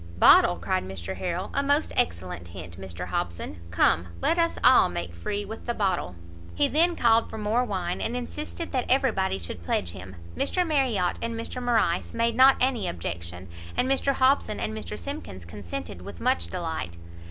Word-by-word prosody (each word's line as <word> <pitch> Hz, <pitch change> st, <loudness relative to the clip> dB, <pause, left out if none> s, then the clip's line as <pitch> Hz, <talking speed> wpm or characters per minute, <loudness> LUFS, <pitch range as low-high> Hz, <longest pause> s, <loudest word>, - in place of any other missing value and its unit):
"Bottle!" 90 Hz, -, +7 dB
cried 85 Hz, +1 st, -1 dB
Mr 95 Hz, -1 st, -6 dB
Harrel, 180 Hz, 0 st, -3 dB
"a 280 Hz, -, +2 dB
most 285 Hz, +2 st, +1 dB
excellent 85 Hz, +1 st, -1 dB
hint, 85 Hz, +1 st, -9 dB
Mr 90 Hz, -2 st, -6 dB
Hobson! 85 Hz, -1 st, -3 dB
come! 85 Hz, +1 st, +3 dB
let 340 Hz, -, +2 dB
us 335 Hz, 0 st, +2 dB
all 255 Hz, 0 st, +7 dB
make 85 Hz, 0 st, -4 dB
free 200 Hz, -, -3 dB
with 220 Hz, +4 st, -9 dB
the 240 Hz, -, -1 dB
bottle!" 185 Hz, -, -1 dB, 0.4 s
He -, -, +3 dB
then 335 Hz, +4 st, +3 dB
called 230 Hz, -4 st, +3 dB
for -, -, -7 dB
more 220 Hz, +3 st, +1 dB
wine, 185 Hz, -6 st, -2 dB
and 235 Hz, -, -2 dB
insisted 300 Hz, +7 st, -5 dB
that 255 Hz, -3 st, -1 dB
every 265 Hz, 0 st, +4 dB
body 190 Hz, -, 0 dB
should 85 Hz, -1 st, -7 dB
pledge 85 Hz, +1 st, -1 dB
him. 95 Hz, 0 st, -10 dB, 0.2 s
Mr 360 Hz, -, +1 dB
Marriot 255 Hz, -, +1 dB
and 230 Hz, 0 st, -2 dB
Mr 230 Hz, +2 st, -5 dB
Morrice 225 Hz, -8 st, +1 dB
made 230 Hz, 0 st, +1 dB
not 260 Hz, +2 st, +7 dB
any 255 Hz, -3 st, +1 dB
objection, 85 Hz, +1 st, -5 dB, 0.3 s
and 255 Hz, -, +2 dB
Mr 270 Hz, +1 st, +2 dB
Hobson 260 Hz, -, +2 dB
and 105 Hz, +1 st, -2 dB
Mr 105 Hz, -1 st, -5 dB
Simkins 90 Hz, 0 st, -7 dB
consented 90 Hz, -1 st, -7 dB
with 95 Hz, -2 st, -9 dB
much 85 Hz, +2 st, +1 dB
delight. 85 Hz, -, -4 dB
175 Hz, 180 wpm, -26 LUFS, -, 0.4 s, Bottle